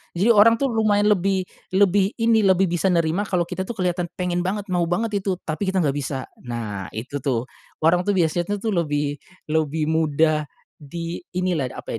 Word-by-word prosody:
Jadi 200 Hz, +7 st, +4 dB
orang 225 Hz, +1 st, +6 dB
tuh 265 Hz, +1 st, -1 dB
lumayan 210 Hz, -2 st, +3 dB
lebih 190 Hz, -1 st, +1 dB, 0.3 s
lebih 195 Hz, +1 st, +3 dB
ini, 230 Hz, -1 st, +3 dB
lebih 190 Hz, -2 st, +3 dB
bisa 175 Hz, +2 st, +1 dB
nerima 175 Hz, +2 st, +1 dB
kalau 180 Hz, -3 st, +1 dB
kita 185 Hz, +2 st, -5 dB
tuh 240 Hz, -, -5 dB
kelihatan 180 Hz, -3 st, -1 dB
pengen 180 Hz, -1 st, -1 dB
banget, 190 Hz, +2 st, -3 dB
mau 175 Hz, -1 st, +2 dB
banget 205 Hz, +4 st, 0 dB
itu 190 Hz, -1 st, -1 dB
tapi 165 Hz, +5 st, -3 dB
kita 190 Hz, -2 st, +1 dB
nggak 140 Hz, -2 st, 0 dB
bisa. 135 Hz, -2 st, -3 dB, 0.2 s
Nah, 110 Hz, -6 st, -5 dB
itu 130 Hz, +6 st, -4 dB
tuh 125 Hz, -4 st, -1 dB, 0.4 s
orang 175 Hz, +3 st, +3 dB
tuh 205 Hz, -, +2 dB
biasanya 175 Hz, +3 st, +1 dB
tuh 220 Hz, -, 0 dB
lebih 145 Hz, -5 st, -1 dB, 0.3 s
lebih 155 Hz, 0 st, 0 dB
mudah 155 Hz, -1 st, +2 dB, 0.3 s
di 165 Hz, +4 st, -6 dB, 0.2 s
inilah, 175 Hz, -8 st, 0 dB
apa -, -, -6 dB
175 Hz, 180 wpm, -23 LUFS, 155-200 Hz, 0.4 s, orang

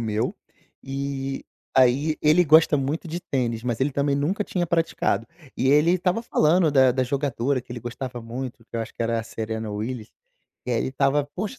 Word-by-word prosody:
meu, 110 Hz, -1 st, -1 dB, 0.5 s
e 135 Hz, 0 st, -4 dB, 0.3 s
aí 135 Hz, +5 st, +4 dB
ele 155 Hz, +4 st, +5 dB
gosta 160 Hz, -1 st, +6 dB
muito 145 Hz, +5 st, -1 dB
de 170 Hz, +2 st, -4 dB
tênis, 120 Hz, -9 st, -2 dB
mas 120 Hz, -1 st, -2 dB
ele 140 Hz, +2 st, +2 dB
também 140 Hz, 0 st, +1 dB
nunca 180 Hz, +9 st, 0 dB
tinha 175 Hz, -3 st, -2 dB
praticado, 165 Hz, -10 st, 0 dB, 0.3 s
e 130 Hz, -, 0 dB
ele 150 Hz, +4 st, +5 dB
estava 185 Hz, +5 st, 0 dB
falando 165 Hz, -4 st, +3 dB
da 130 Hz, -2 st, +5 dB
da 130 Hz, +1 st, +1 dB
jogadora 135 Hz, 0 st, -1 dB
que 120 Hz, -, -23 dB
ele 120 Hz, -1 st, -5 dB
gostava 120 Hz, +1 st, -6 dB
muito, 120 Hz, 0 st, -6 dB
que -, -, -22 dB
eu 115 Hz, -, -1 dB
acho 110 Hz, -, -6 dB
que -, -, -3 dB
era 115 Hz, 0 st, 0 dB
a -, -, -7 dB
Serena 110 Hz, -1 st, -5 dB
Willys, 110 Hz, +2 st, -4 dB, 0.6 s
eh, 120 Hz, -2 st, +1 dB
ele -, -, -1 dB
estava: 135 Hz, +2 st, +1 dB
"Poxa, 215 Hz, +7 st, -4 dB
135 Hz, 190 wpm, -24 LUFS, 120-155 Hz, 0.6 s, gosta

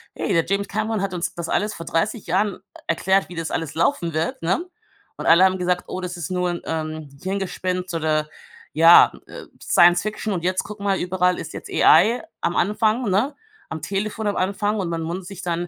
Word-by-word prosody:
„Hey, -, -, -2 dB
der 165 Hz, -2 st, +2 dB
James 200 Hz, +2 st, -1 dB
Cameron 215 Hz, -1 st, -1 dB
hat 195 Hz, -2 st, -2 dB
uns 175 Hz, -1 st, -3 dB
das 170 Hz, -1 st, -5 dB
alles 210 Hz, +1 st, 0 dB
vor 165 Hz, -, -8 dB
30 195 Hz, +7 st, -1 dB
Jahren 190 Hz, +3 st, 0 dB, 0.3 s
erklärt, 190 Hz, +1 st, +1 dB
wie 175 Hz, -, -9 dB
das 165 Hz, -1 st, -4 dB
alles 160 Hz, -3 st, -3 dB
laufen 170 Hz, -, 0 dB
wird,“ 160 Hz, +2 st, -2 dB
ne? 185 Hz, -, 0 dB, 0.5 s
Und -, -, -6 dB
alle 170 Hz, +3 st, +6 dB
haben 190 Hz, 0 st, +4 dB
gesagt: 180 Hz, 0 st, -1 dB
„Oh, -, -, -5 dB
das 180 Hz, 0 st, -5 dB
ist 175 Hz, +2 st, -5 dB
nur 180 Hz, -1 st, 0 dB
'n, 175 Hz, -, -5 dB
ähm, 155 Hz, -2 st, -4 dB
Hirngespinst“, 185 Hz, -1 st, -3 dB
oder 155 Hz, -2 st, 0 dB, 0.5 s
ja, 165 Hz, +3 st, +8 dB, 0.2 s
äh, -, -, -10 dB, 0.2 s
Science 175 Hz, 0 st, +5 dB
Fiction. 215 Hz, 0 st, -3 dB
Und 175 Hz, -2 st, -3 dB
jetzt, 185 Hz, +1 st, 0 dB
guck 210 Hz, 0 st, -9 dB
mal, 200 Hz, -1 st, 0 dB
überall 180 Hz, 0 st, +1 dB
ist -, -, -7 dB
jetzt -, -, -8 dB
AI 215 Hz, +10 st, +5 dB, 0.2 s
am 175 Hz, -, -1 dB
Anfang, 215 Hz, +4 st, +1 dB
ne? 235 Hz, +10 st, +1 dB, 0.3 s
Am 160 Hz, -, -6 dB
Telefon 210 Hz, +4 st, -3 dB
am 205 Hz, -, 0 dB
Anfang 205 Hz, +3 st, 0 dB
und 180 Hz, -, -2 dB
man 165 Hz, -1 st, -3 dB
wundert 180 Hz, +2 st, -5 dB
sich 195 Hz, -1 st, -8 dB
dann, 175 Hz, 0 st, -2 dB
180 Hz, 205 wpm, -22 LUFS, 170-200 Hz, 0.5 s, ja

